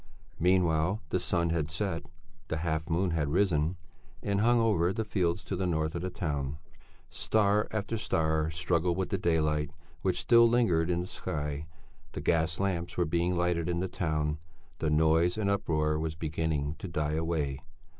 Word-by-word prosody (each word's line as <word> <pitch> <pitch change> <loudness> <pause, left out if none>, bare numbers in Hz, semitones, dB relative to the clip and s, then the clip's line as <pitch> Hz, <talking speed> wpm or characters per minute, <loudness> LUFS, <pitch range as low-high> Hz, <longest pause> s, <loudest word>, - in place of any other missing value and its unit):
Meanwhile 90 +1 +2
the 90 - +1
sun 85 -2 0
had 80 -2 -1
set; 85 0 -3 0.4
the 80 - -2
half 80 0 -2
moon 90 +2 +1
had 75 -3 0
risen 85 -1 +1 0.5
and 100 0 +1
hung 120 +2 +4
over 100 -6 +2
the 110 +2 -2
fields 90 -3 0
to 95 - -3
the 90 0 -1
north 80 -2 0
of 85 - -3
the 90 - -2
town. 75 -7 -3 0.5
Star 105 -1 +2
after 110 +1 -2
star 80 -6 +1
struggled 85 +1 0
with 95 -2 -1
the 95 - -1
daylight 75 -3 +1 0.3
which - - 0
still 115 0 +6
lingered 90 -9 +2
in 85 0 +1
the - - -4
sky; 75 -3 -4 0.5
the - - -4
gas 80 -1 +1
lamps 90 -3 -1
were 90 - +2
being 85 +2 0
lighted 85 -1 +1
in 85 -1 0
the 95 - -1
town; 75 -4 -1 0.4
the 80 - 0
noise 80 +4 +3
and 100 -2 +1
uproar 75 -5 0
was 80 0 -2
beginning 75 -2 -1
to 95 - -5
die 75 -3 -1
away. 80 -4 -1
85 Hz, 175 wpm, -30 LUFS, 80-95 Hz, 0.5 s, still